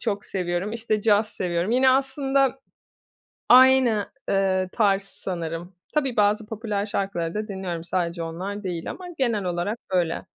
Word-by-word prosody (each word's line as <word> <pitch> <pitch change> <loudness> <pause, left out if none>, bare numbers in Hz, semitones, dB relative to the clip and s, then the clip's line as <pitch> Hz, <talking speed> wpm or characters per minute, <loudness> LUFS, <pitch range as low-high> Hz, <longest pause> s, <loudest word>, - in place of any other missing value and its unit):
çok 205 -3 -2
seviyorum, 180 +2 -2
işte, 220 -2 -1
caz 210 -1 +3
seviyorum. 175 +1 -2
Yine 260 +2 +5
aslında 270 0 +1 0.9
aynı, 255 -4 +6 0.2
eee, 190 -1 +1
tarz 200 -3 +2
sanırım. 175 -2 -6 0.2
Tabii, 275 -5 0
bazı 210 +1 +2
popüler 215 -2 -3
şarkıları 195 -5 -2
da 215 +1 -3
dinliyorum. 180 -4 -4
Sadece 170 -1 -2
onlar 185 +6 -5
değil 175 -3 -4
ama 370 - -8
genel 230 -6 0
olarak 180 +5 -2
öyle. 175 -3 0
200 Hz, 140 wpm, -24 LUFS, 180-230 Hz, 0.9 s, aynı